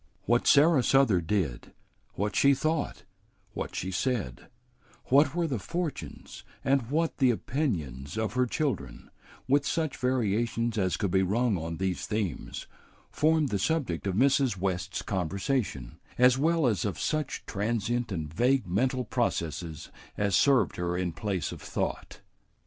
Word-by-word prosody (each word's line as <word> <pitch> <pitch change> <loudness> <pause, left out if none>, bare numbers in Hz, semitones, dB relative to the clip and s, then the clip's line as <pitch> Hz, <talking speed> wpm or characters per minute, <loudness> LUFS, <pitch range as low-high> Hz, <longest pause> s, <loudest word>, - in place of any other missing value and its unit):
What 120 +2 +2
Sarah 150 0 +6
Souther 125 -8 +4
did, 80 -8 -2 0.4
what 105 +2 -2
she 140 0 +5
thought, 155 +2 -2 0.5
what - - -5
she 95 - -3
said, 100 - -2 0.6
what 140 +2 +4
were 175 -1 +1
the 135 -8 -2
fortunes 155 - -5 0.2
and 135 -3 +2
what 160 +3 0
the 130 -4 +4
opinions 95 - -2
of 110 -2 -1
her 125 0 +2
children, 120 - -3 0.4
with 140 +2 +3
such 155 0 -1
variations 115 -2 0
as 95 -2 +1
could 100 -5 -1
be 95 - +3
rung 110 +4 +1
on 80 -1 -4
these 95 0 -2
themes, 105 -7 -3 0.5
formed 155 -1 +2
the 100 - -1
subject 125 - -1
of 95 - -1
Mrs. 135 -2 +3
West's 95 0 -2
conversation, 95 - -2 0.2
as 125 0 +6
well 160 +3 +2
as 110 -6 +1
of 100 -3 -3
such 155 -2 -2
transient 115 +3 -1
and 80 -4 -4
vague 125 +8 +2
mental 125 +7 0
processes 80 - -2 0.3
as 100 -2 +1
served 140 -3 +3
her 90 0 -1
in 90 -1 -1
place 95 -2 -2
of - - -9
thought. - - -4
115 Hz, 145 wpm, -28 LUFS, 95-135 Hz, 0.6 s, Sarah